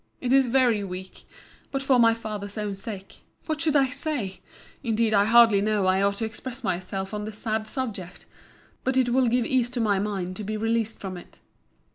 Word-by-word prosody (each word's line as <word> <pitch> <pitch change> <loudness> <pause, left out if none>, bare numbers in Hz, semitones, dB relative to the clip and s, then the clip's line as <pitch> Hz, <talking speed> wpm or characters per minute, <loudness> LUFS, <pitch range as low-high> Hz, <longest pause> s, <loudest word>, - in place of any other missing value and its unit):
—it 250 0 0
is 270 -1 +5
very 240 -4 +3
weak!—But 190 +8 -8
for 265 -2 +4
my 230 -1 +5
father's 210 -2 -6
own 210 -1 -2
sake—what 205 - -7
should 310 -2 +1
I 270 -2 +4
say!—Indeed 230 - -3
I 200 -1 +5
hardly 225 -2 +6
know 210 -1 +1
how - - +2
I 190 +1 +3
ought 200 0 +2
to 225 - -2
express 245 +4 -7
myself 190 +1 -3
on 210 0 -3
this 215 -1 -7
sad 220 -1 -2
subject!—but 225 +3 -6
it 255 -2 +3
will 255 +1 +3
give 240 0 +2
ease 250 -1 +1
to 250 0 -4
my 205 -4 +2
mind 190 -3 -3
to 215 - -5
be 215 +2 -3
released 225 0 0
from 190 -2 -6
it. 175 - -13
220 Hz, 185 wpm, -26 LUFS, 200-250 Hz, -, hardly